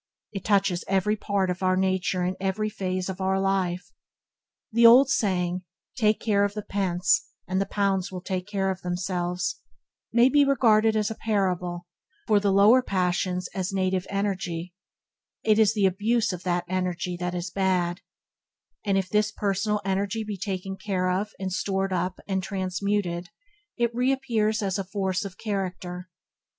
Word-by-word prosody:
It 195 -3 -6
touches 195 -4 +2
every 195 +2 +2
part 200 -3 0
of 180 - -5
our 185 0 +2
nature 185 -1 0
and 180 +1 -1
every 195 +3 -1
phase 185 -3 -3
of 190 0 -5
our 190 0 +1
life. 185 -2 -1 0.8
The 235 +1 +3
old 250 +4 +8
saying, 180 -6 0 0.3
"Take 215 -4 +2
care 205 -3 +2
of 205 0 -1
the 210 - -4
pence, 195 +1 +1 0.2
and 185 +1 0
the 195 - -1
pounds 195 -2 0
will 185 -1 -6
take 185 -2 -3
care 195 -2 0
of 190 - -6
themselves", 180 0 -2 0.5
may 235 +2 +5
be 285 +2 +5
regarded 225 -5 +4
as 215 0 +1
a - - -4
parable, 180 -5 -1 0.4
for 210 -3 +4
the 200 -1 +1
lower 205 +6 +6
passions 180 -3 -1
as 190 0 -2
native 185 -1 0
energy; 185 -4 -2 0.7
it 215 0 +3
is 220 0 +4
the 205 -2 +3
abuse 210 +3 +1
of 180 - -6
that 175 -1 -1
energy 180 -1 -2
that 180 0 -3
is 175 0 -4
bad, 185 -2 0 0.8
and 200 -2 +1
if 190 -1 0
this 210 +1 +1
personal 205 +1 -1
energy 195 +3 -1
be 210 -1 -4
taken 195 -1 -4
care 185 -3 -1
of 195 +3 -1
and 190 -1 -3
stored 195 0 -1
up 180 +1 -2
and 190 -1 0
transmuted, 185 -2 -2 0.5
it 235 -1 +1
reappears 240 -4 +1
as 195 0 -1
force 190 -2 -1
of 190 -2 -8
character. 185 -3 -4
195 Hz, 160 wpm, -26 LUFS, 185-210 Hz, 0.8 s, old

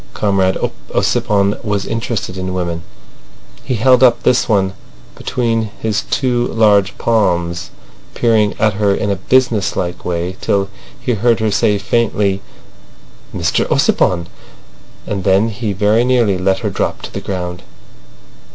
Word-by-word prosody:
Comrade 95 -2 +1 0.4
Ossipon 100 0 +1
was 100 -2 -1
interested 115 -4 -3
in 95 0 -4
women. 85 -2 -2 0.8
He 125 - -2
held 125 +3 +4
up 125 -2 +4
this 125 - +2
one 95 -3 +2 0.4
between 115 -3 -1
his 110 -2 -1
two 125 -3 +1
large 105 -3 +3
palms, 85 -6 0 0.5
peering 110 -3 +2
at 110 -1 +2
her 100 0 +1
in 100 - -1
a - - +1
business 115 +1 +1
like 85 0 -3
way 90 +2 -3
till 100 -1 0 0.3
he 125 -1 -1
heard 115 +1 +2
her 110 -1 0
say 100 +1 +2
faintly 100 -2 0 0.9
"Mr - - 0
Ossipon!" 85 -2 +2 0.8
and 100 -2 -3
then 100 +4 +3
he 110 0 -3
very 105 +4 +2
nearly 120 -7 +2
let 95 +1 +1
her - - 0
drop - - -2
to - - -8
the - - -4
ground. 90 -2 -4
100 Hz, 140 wpm, -16 LUFS, 95-115 Hz, 0.9 s, held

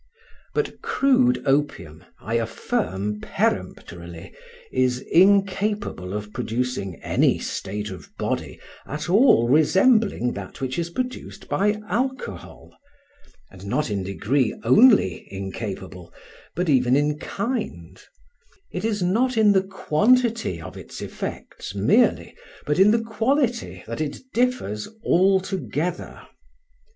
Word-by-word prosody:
But 445 - -2
crude 255 -2 +2
opium, 135 - -1 0.2
I 110 - -5
affirm 115 - -2
peremptorily, 85 -1 -3 0.4
is 130 -1 +1
incapable 195 - +2
of 105 0 -6
producing 120 -5 -3
any - - +2
state 105 +1 -4
of 95 - -10
body - - -3 0.3
at 150 +4 -4
all 195 - +5
resembling 185 - +3
that 100 -1 -8
which 130 +3 -3
is 170 0 -2
produced 255 +8 -5
by 210 +2 +1
alcohol, 260 +7 -4 0.8
and 95 +1 -11
not 150 +3 -1
in 100 -1 -1
degree 110 +8 0
only 210 - +5
incapable, 95 -3 -6 0.4
but 180 +1 -1
even 130 -3 +3
in 150 +1 +1
kind: 195 - -4 0.7
it 180 - -4
is 210 -4 0
not 230 +7 +1
in 215 -2 +6
the 190 -1 +4
quantity 210 - +1
of 80 - -9
its - - -9
effects - - -7
merely, - - +2 0.3
but 150 +3 0
in 195 +2 +7
the 225 +1 +2
quality, 235 +2 -1
that 115 +6 -5
it 150 -2 -3 0.2
differs 240 - 0 0.2
altogether. 185 -2 0
155 Hz, 115 wpm, -23 LUFS, -, 0.8 s, in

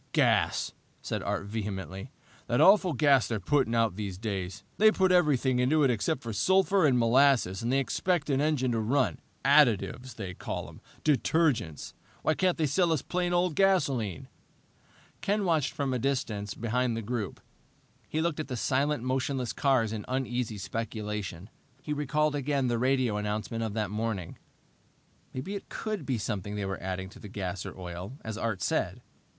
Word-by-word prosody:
"Gas!" - - +2 0.3
said - - -3
Art - - -2
vehemently. 100 - -5 0.4
"The 120 - +1
awful 190 -3 +6
gas 140 -2 +4
they're 115 -2 -2
putting 125 +3 +1
out 115 -5 +1
these 100 -4 -4
days. 95 -2 -4 0.2
They 215 +1 +7
put 190 -3 +2
everything 140 -7 +3
into 150 +5 +3
it 135 - +4
except 130 +6 -1
sulphur 190 - +3
and 130 -3 +3
molasses, 120 -5 +3
and 115 +2 -1
they 135 - +3
expect 160 +4 0
an 135 0 +2
engine 145 -5 +1
to 115 - 0
run. 130 +5 +1 0.3
Additives, 130 -3 +3
they 95 -5 -5
call - - -5
'em! - - -14 0.2
Detergents! 140 - +1 0.3
Why 155 - +3
can't 185 +1 +1
they 160 - +1
sell 170 +4 +2
us 155 -4 0
plain 180 0 -1
old 175 -1 +2
gasoline?" 140 - +1 0.9
Ken 205 0 0
watched 160 -5 +2
from 140 -2 -1
a 125 - 0
distance 110 -6 -2
behind 120 +1 0
the 115 - -4
group. 110 -2 -3 0.7
He 155 - -1
looked 165 -2 -1
at 155 - -3
the 130 -3 -4
silent, 140 +2 0
motionless 130 -1 -1
cars 125 -6 +2
in 105 -2 -4
uneasy 125 -3 -2
speculation. 105 -4 -4 0.4
He 150 - -2
recalled 150 +1 +1
again 140 -2 0
the 120 -1 0
radio 130 -4 +2
announcement 105 +2 -2
of 110 -2 -3
that 105 -3 -1
morning. 105 -5 -3 0.9
Maybe 135 +10 -5
it 200 - -7
could 215 -9 -4
be 130 -3 0
something 105 -2 -3
they 105 -1 -2
were 95 0 -4
adding 95 0 -3
to - - -14
the 105 - -10
gas 95 -2 -4
or - - -9
oil, 90 +4 -6
as 110 -1 -4
Art 110 -4 -2
said. - - -1
125 Hz, 170 wpm, -29 LUFS, 105-150 Hz, 0.9 s, They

